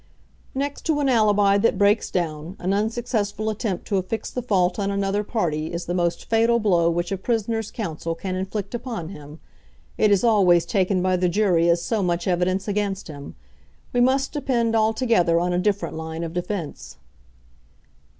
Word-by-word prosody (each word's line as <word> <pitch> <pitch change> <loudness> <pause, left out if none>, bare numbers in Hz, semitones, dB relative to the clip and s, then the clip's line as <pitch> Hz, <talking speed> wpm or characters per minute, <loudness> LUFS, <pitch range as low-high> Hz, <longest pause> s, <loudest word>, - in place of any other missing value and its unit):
"Next 285 +1 -3
to 310 -2 +2
an 285 - +1
alibi 205 -4 +4
that 205 -1 +2
breaks 205 +2 +3
down, 165 0 -3
an 185 +2 -1
unsuccessful 220 0 -1
attempt 205 -3 -3
to 200 - 0
affix 190 +4 -3
the 250 - -3
fault 185 -5 +1
on 200 -1 0
another 200 +1 0
party 160 -8 -2
is 170 0 -4
the 175 - -3
most 175 -1 -1
fatal 230 +1 +3
blow 175 -6 +3
which 175 +2 -1
a 195 - -1
prisoner's 225 +1 -1
counsel 165 -5 -4
can 185 +2 -4
inflict 190 +2 -4
upon 235 -9 -5
him. 150 -3 -11 0.6
It 215 - +4
is 200 0 +3
always 185 -7 +4
taken 185 0 +1
by 185 0 +2
the 180 0 +1
jury 175 -3 +2
as 170 0 +2
so 225 -3 0
much 175 -1 -1
evidence 185 +2 0
against 200 -2 -2
him. 145 -2 -9 0.6
We 245 - +2
must 265 +2 +2
depend 235 -6 0
altogether 220 -6 +2
on 180 +1 0
a 175 - +1
different 200 -1 -1
line 160 +1 -5
of 165 -1 -5
defence." 180 -2 -5
195 Hz, 175 wpm, -23 LUFS, 175-220 Hz, 0.6 s, alibi